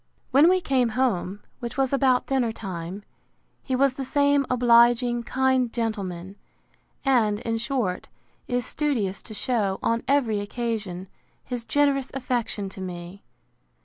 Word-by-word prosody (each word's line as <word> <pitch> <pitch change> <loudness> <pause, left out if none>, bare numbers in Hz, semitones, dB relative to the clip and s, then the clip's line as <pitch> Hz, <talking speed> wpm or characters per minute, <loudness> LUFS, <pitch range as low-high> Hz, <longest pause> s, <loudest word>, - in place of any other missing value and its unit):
When 285 +6 +6
we 370 0 +3
came 260 -6 +2
home, 205 -6 0 0.2
which 240 0 -6
was 270 0 +1
about 265 -2 +3
dinner 260 -4 +1
time, 190 -2 -6 0.6
he 260 - -2
was 270 0 +3
the 270 - -5
same 285 0 +2
obliging, 240 0 +4
kind 260 0 +1
gentleman; 200 -5 -4 0.7
and, 225 -6 +3
in 225 -1 -2
short, 235 -7 -2 0.4
is 245 -1 -1
studious 230 -11 -1
to 215 - -8
shew, 205 -5 0
on 230 0 +1
every 250 -7 +2
occasion, 205 -4 -4 0.4
his 245 -2 -5
generous 280 -1 +2
affection 240 -6 -2
to 190 - -10
me. 180 +1 -7
240 Hz, 135 wpm, -25 LUFS, 205-265 Hz, 0.7 s, When